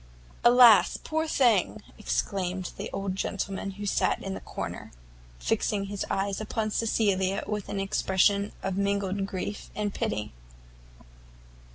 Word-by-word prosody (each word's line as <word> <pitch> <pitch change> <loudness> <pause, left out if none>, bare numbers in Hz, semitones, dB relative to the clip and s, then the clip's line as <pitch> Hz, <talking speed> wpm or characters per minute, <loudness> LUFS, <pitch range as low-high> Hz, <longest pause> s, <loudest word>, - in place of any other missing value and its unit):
"Alas! 240 -5 +7
poor 315 +1 -2
thing!" 220 - +2
exclaimed 185 -3 -2
the - - -5
old 195 -1 -3
gentleman 195 0 -3
who 205 - -5
sat 200 - +1
in 195 - -4
the - - -5
corner, - - -6 0.5
fixing 195 - 0
his 200 0 -4
eyes 195 +1 -1
upon 215 0 -2
Cecilia 200 -4 +1
with 210 -2 -4
an 200 - -2
expression 195 +1 +2
of 195 -1 -2
mingled 200 -1 0
grief 200 +1 -5
and 205 -1 -2
pity. 105 0 -2
200 Hz, 130 wpm, -27 LUFS, 190-210 Hz, 0.5 s, Alas